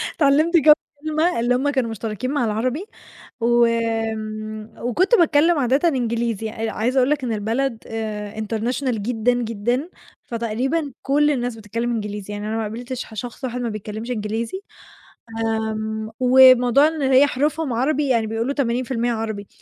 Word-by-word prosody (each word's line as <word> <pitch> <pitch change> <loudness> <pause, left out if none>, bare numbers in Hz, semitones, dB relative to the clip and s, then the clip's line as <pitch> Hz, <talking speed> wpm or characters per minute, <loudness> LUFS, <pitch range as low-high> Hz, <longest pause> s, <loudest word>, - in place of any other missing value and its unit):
اتعلمت 310 +3 +4
كام 305 -1 +8 0.3
كلمة، 310 -1 +1
اللي 240 +2 +2
هُم 270 +3 +1
كانوا 260 -5 0
مشتركين 225 +3 -4
مع 285 -4 +1
العربي، 250 - -1 0.6
و 240 0 +4 1.1
وكنت 355 - +2
باتكلّم 325 0 +4
عادةً 275 +6 +2
إنجليزي، 235 -5 -1
آآ 225 0 -4
عايزة 240 +6 -1
أقول 255 0 +4
لك 295 -2 0
إن 235 -3 -1
البلد 225 +4 -1
آآ 215 -2 -5
international 230 +5 -2
جدًا، 230 +2 +1
جدًا، 240 - -2 0.3
فتقريبًا 250 +7 -2
كل 295 +2 +2
الناس 245 -4 -2
بتتكلم 225 +2 -3
إنجليزي، 210 -2 -4
يعني 205 0 -5
أنا 220 - -2
ما - - -1
قابلتش 240 +4 -5
ح - - -14
شخص 240 +5 -7
واحد 250 -1 -3
ما 240 - -2
بيتكلمش 215 +2 -6
إنجليزي، 225 - -3 0.8
آمم، 220 -1 -2
وموضوع 255 +1 +6
إن 315 -1 -3
هي 270 +1 +5
حروفهم 290 +1 -1
عربي 280 +5 +1
يعني 230 -3 +2
بيقولوا 225 +5 -2
80% 240 -2 -1
عربي، 220 -3 -4
240 Hz, 150 wpm, -21 LUFS, 220-275 Hz, 1.1 s, كام